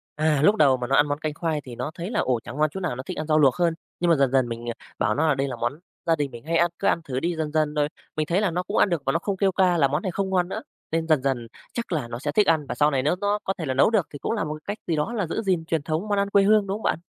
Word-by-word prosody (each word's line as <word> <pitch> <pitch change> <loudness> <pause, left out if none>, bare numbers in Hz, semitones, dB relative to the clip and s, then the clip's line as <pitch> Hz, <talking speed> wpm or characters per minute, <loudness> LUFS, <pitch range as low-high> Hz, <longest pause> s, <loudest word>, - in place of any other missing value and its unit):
À, 150 -2 +2
lúc 205 +7 +6
đầu 140 -9 +4
mà 125 -1 -4
nó 135 - +2
ăn 145 +1 +5
món 145 0 -2
canh 155 -1 -3
khoai 155 -1 -2
thì 125 -3 -10
nó 145 - -4
thấy 175 +4 -5
là, - - 0
ồ, 125 -2 +1
chẳng - - -8
ngon 155 0 +3
chỗ 190 - -5
nào 180 -9 -2
nó 130 - -6
thích - - -6
ăn 155 - -3
rau 155 -1 +3
luộc 135 -4 +5
hơn. 170 -2 +2 0.3
Nhưng 175 0 +1
mà - - +6
dần 135 -2 +2
dần 130 -2 +3
mình, 115 0 -6
ờ, 120 - -1 0.3
bảo 110 - +1
nó 160 +3 +2
là 145 - +3
đây 135 +1 -1
là 130 - -4
món 120 +5 -3 0.3
gia 165 - +3
đình 145 -3 -2
mình 120 +3 -11
hay 165 +1 +1
ăn, 170 +1 +3
cứ - - 0
ăn 170 - +2
thử 130 -4 -3
đi 170 +3 -1
dần 155 -2 -3
dần 155 -1 +1
rồi, 145 -1 +1 0.3
mình 155 - 0
thấy 180 +4 +1
là 205 -4 +1
nó 180 +2 -1
cũng 200 +4 -3
ăn - - +4
được 170 -4 0
và 135 - +2
nó 165 - +2
không 195 +1 -3
kêu 195 -1 +2
ca 185 -2 +3
là 140 -4 +4
món 150 +4 -1
này 185 - -1
không 195 +2 -2
ngon 180 -1 +1
nữa. - - -4 0.3
Nên 165 0 0
dần 155 -4 +3
dần 125 -4 -1 0.3
chắc 235 -4 -4
là 150 -8 -1
nó 120 0 -6
sẽ 145 +2 -2
thích 205 +6 +3
ăn 160 -3 +3
và - - -3
sau 150 +1 +3
này 135 -2 0
nếu 150 +5 +2
nó 205 +1 +1
có 195 - -1
thể 160 - -4
là 130 - -1
nấu 135 - +4
được 215 -7 +1
thì 145 - -7
cũng - - -2
là 225 -4 0
một 150 -1 -3
cái 155 +7 -5
cách - - -32
gì 165 - +1
đó 150 +10 -1
là 205 -7 -1
giữ 195 - -2
gìn 185 -6 0
truyền 160 -2 0
thống 160 +7 -2
món 205 -1 0
ăn 200 0 0
quê 200 0 +4
hương, 210 0 +4
đúng 195 - -1
không 220 - -12
bạn? - - +1
155 Hz, 370 wpm, -24 LUFS, 140-180 Hz, 0.3 s, lúc